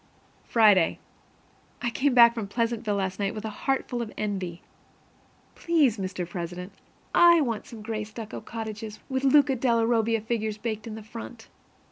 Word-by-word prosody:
Friday. 210 -7 +4 0.8
I 240 - -2
came 270 +2 +1
back 235 -1 +8
from 225 -4 -4
Pleasantville 230 -1 -1
last 190 -1 -2
night 200 0 -1
with 215 0 -6
a 220 - -3
heart 270 +5 -1
full 245 -2 -3
of 225 -2 -5
envy. 190 -4 -3 0.9
Please, 295 -10 +2
Mr. 185 -2 -4
President, 175 +2 -6 0.4
I 340 -1 +7
want 230 -6 -2
some 220 -3 -10
gray 215 -1 -3
stucco 220 +1 -8
cottages, 220 -1 -6
with 265 0 -1
Luca 275 0 +5
della 235 -2 +2
Robbia 225 -1 +2
figures 220 -1 -2
baked 220 0 -4
into 220 0 -6
the - - -21
front. 230 0 -9
220 Hz, 160 wpm, -26 LUFS, 205-240 Hz, 0.9 s, back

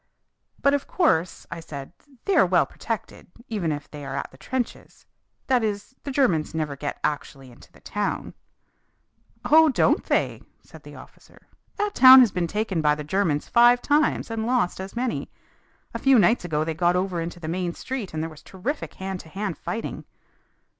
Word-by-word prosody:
"But 280 - +4
of 285 -1 -1
course," 180 - +1
I 170 - -5
said, 145 -2 -9 0.3
"they 395 - +1
are - - +6
well 175 -5 +3
protected, 225 +8 -6 0.2
even 195 -8 -1
if 145 -1 -5
they 150 -1 -8
are 135 0 -5
at 140 - -4
the 130 - -17
trenches. 255 -2 -5 0.4
That 255 -3 +2
is, 205 +3 -3
the - - -3
Germans 190 - +1
never 155 -3 -2
get 145 +1 -5
actually 135 -3 -3
into 120 - -18
the - - -21
town." 205 0 -3 1.1
"Oh, 315 +1 +6
don't 265 - +2
they?" - - 0 0.2
said - - -15
the - - -12
officer. - - -16 0.3
"That 415 0 -1
town 260 0 +10
has 235 -5 +4
been 180 -2 -1
taken 205 -2 -1
by 150 -1 +3
the 150 - -6
Germans 155 -2 0
five 240 +1 +5
times 295 -2 +1
and 225 0 -2
lost 240 -8 0
as 190 +3 -8
many. 245 0 -2 0.6
A - - -4
few 270 -2 +5
nights 225 +2 +4
ago 155 -3 0
they 160 0 -2
got 175 +2 +2
over 180 -2 -1
into 170 +1 -6
the 160 - -7
main 175 +1 -2
street 255 -7 -5
and 155 0 -3
there 165 - -4
was 155 - -14
terrific 250 +11 -5
hand 190 -1 -5
to 160 - -12
hand 195 0 -4
fighting." 225 0 -5
190 Hz, 190 wpm, -24 LUFS, 160-245 Hz, 1.1 s, town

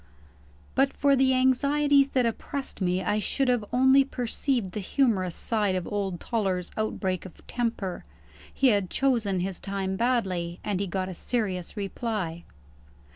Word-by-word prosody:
But 270 +1 +2
for 280 -1 +4
the 260 0 +3
anxieties 280 +2 +3
that 250 - +4
oppressed 265 +2 -4
me, 180 0 +1
I 210 +3 +1
should 270 +6 0
have 245 -3 +2
only 265 +2 +5
perceived 245 -4 -2
the 210 - -4
humorous 195 - +1
side 210 -4 0
of 185 - -2
old 195 -4 -2
Toller's 190 -6 -1
outbreak 190 -4 -2
of 185 - -13
temper. 230 -6 -3 0.5
He 270 - +3
had 200 -5 +1
chosen 225 -9 +1
his 190 0 -3
time 195 -1 -3
badly, 190 -8 0
and 205 -3 -1
he 200 - -1
got 185 +1 -2
a 185 - -5
serious 190 -2 -2
reply. 195 -5 -3
210 Hz, 150 wpm, -27 LUFS, 185-255 Hz, 0.5 s, only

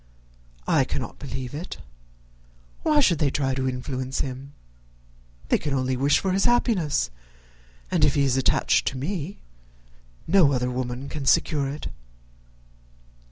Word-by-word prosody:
"I - - +4
cannot - - -5
believe 130 -1 -6
it. 160 +5 -6 1.0
Why 300 -2 +3
should 170 - +3
they 150 - +3
try 135 -1 0
to 130 0 0
influence 130 +1 -3
him? 135 +1 -6 1.0
They - - +3
can 145 -2 -2
only 130 0 0
wish 140 +3 +3
his 190 0 +1
happiness; 190 - +2 0.8
and - - +2
if - - +4
he 140 - +3
is 135 -2 +2
attached 130 -1 +2
to 130 - -1
me 170 +5 -4 0.8
no 165 -6 +5
other 125 -1 0
woman 125 +1 -4
can 140 -2 -5
secure 140 -1 +3
it." 145 +2 -5
140 Hz, 135 wpm, -25 LUFS, 130-160 Hz, 1.0 s, no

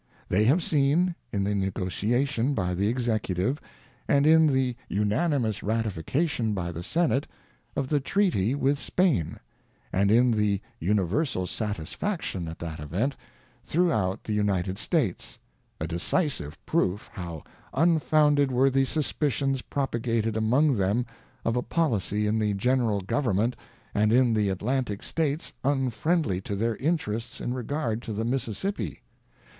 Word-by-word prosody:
ŌĆö - - -40 0.2
They 100 +4 +3
have 155 +9 +4
seen, 155 +5 +2 0.2
in 100 -1 0
the 100 +1 0
negotiation 115 +8 0
by 90 -3 0
the 100 +3 +1
Executive, 115 - 0 0.5
and 140 0 +3
in. 160 0 +6
the 130 -3 +1
unanimous 110 - +1
ratification 110 - -1
by 85 -2 -2
the 85 0 -6
Senate, 150 - +1 0.5
of 135 - -1
the 150 - +2
Treaty 140 - +1
with 140 0 +1
Spain, 160 - +1 0.5
and 100 +1 +3
in 120 +3 +5
the 105 -3 +1 0.2
universal 100 - 0
satisfaction 105 - -3
at 80 - -6
that 80 -2 -6
event, 95 - -1 0.5
throughout 110 - +1
the 110 - -3
United 100 -2 0
States, 130 - -1 0.4
a 80 - -2
decisive 85 - -1
proof 95 +4 0
how 85 -6 -6 0.3
un 165 +3 +3
founded 145 -3 +3
were 130 +2 +3
the 135 0 +3
suspicions 135 -2 0
propagated 115 -5 -1
among 125 +5 +3
them 100 +5 +1 0.4
of 115 - +1
a 125 - +1
policy 105 - 0
in 110 +1 +1
the 105 -2 +1
General 115 -1 +1
Government 115 +2 0 0.4
and 105 +1 +3
in 125 0 +4
the 105 -2 +2
Atlantic 105 +2 -1
States 155 -1 -2
un 135 -2 +1
friendly 150 - 0
to 100 - -4
their 115 +3 0
interests 115 -7 -2
in 120 - -2
regard 125 -2 -2
to 115 - -5
the 110 +2 -2
Mississippi. 130 - -2
115 Hz, 140 wpm, -27 LUFS, 100-140 Hz, 0.5 s, in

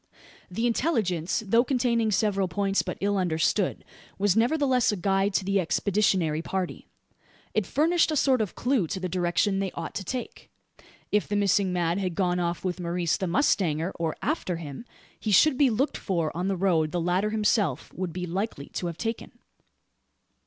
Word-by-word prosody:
The 225 +6 -2
intelligence, 220 - 0
though 230 +4 +4
containing 240 -4 +1
several 195 -1 +1
points 195 +3 0
but - - -5
ill 200 0 +1
understood, 180 +2 0 0.3
was 200 -1 +2
nevertheless 255 +1 +2
a - - -1
guide 195 +2 +1
to 190 - +1
the 195 0 +2
expeditionary 185 -3 +1
party. 185 +1 -4 0.7
It 215 -4 0
furnished 330 +4 +2
a 310 - 0
sort 260 -4 +3
of 210 - -3
clue 245 -8 +1
to 190 - -4
the 185 - -2
direction 180 +3 0
they 195 -1 -1
ought - - -6
to 195 - -4
take. 250 +6 -6 0.6
If 210 - +1
the 205 - -2
missing 200 -1 +2
man 175 0 0
had 185 -3 -2
gone 180 -1 +1
off 170 +1 -2
with 180 0 -2
Maurice 175 -1 0
the 190 - -2
mustanger, 170 - +1
or 165 -2 -2
after 260 - -1
him, 160 - -8 0.3
he 220 - -3
should 265 +9 +5
be 280 -1 +4
looked 250 +6 0
for 170 -6 -2
on 180 +2 -1
the 195 -1 0
road 170 -5 +2
the 175 - -1
latter 180 +5 +1
himself 210 - 0
would 185 -1 -4
be 180 +2 -4
likely 180 -4 -4
to 175 - -4
have 170 -1 -5
taken. 225 0 -4
195 Hz, 180 wpm, -26 LUFS, 175-220 Hz, 0.7 s, should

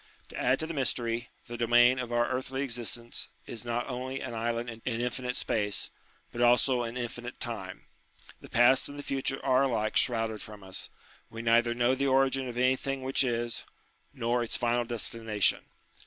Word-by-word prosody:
To - - -10
add 130 +2 +2
to - - -1
the 165 - -5
mystery, 120 -4 -1 0.2
the 120 - -7
domain 120 +2 +5
of 125 -2 -4
our 120 0 +2
earthly 130 +1 -2
existence 120 -2 -3 0.2
is 115 - -6
not 120 0 -2
only 130 +1 -4
an 120 - -5
island 115 +1 -1
in 115 -1 -7
infinite 125 +1 -2
space, 105 -2 0 0.4
but 120 - -4
also 120 +1 +4
in 120 +1 -4
infinite 120 0 -5
time. 100 -6 -5 0.5
The - - -13
past 120 +4 +5
and 145 - -9
the 145 - -6
future 135 -1 -2
are 130 -1 +4
alike 110 -5 0
shrouded 115 -3 +1
from 105 -2 -10
us: 95 -1 -5 0.4
we 115 0 -7
neither 120 +1 +3
know 120 +1 +3
the 140 +1 0
origin 135 0 +2
of 120 -1 -6
anything 130 +1 +1
which 135 +1 +2
is, 120 -2 -2 0.5
nor 120 -2 0
its 115 - 0
final 120 0 +1
destination. 115 -3 +1
120 Hz, 175 wpm, -29 LUFS, 115-130 Hz, 0.5 s, domain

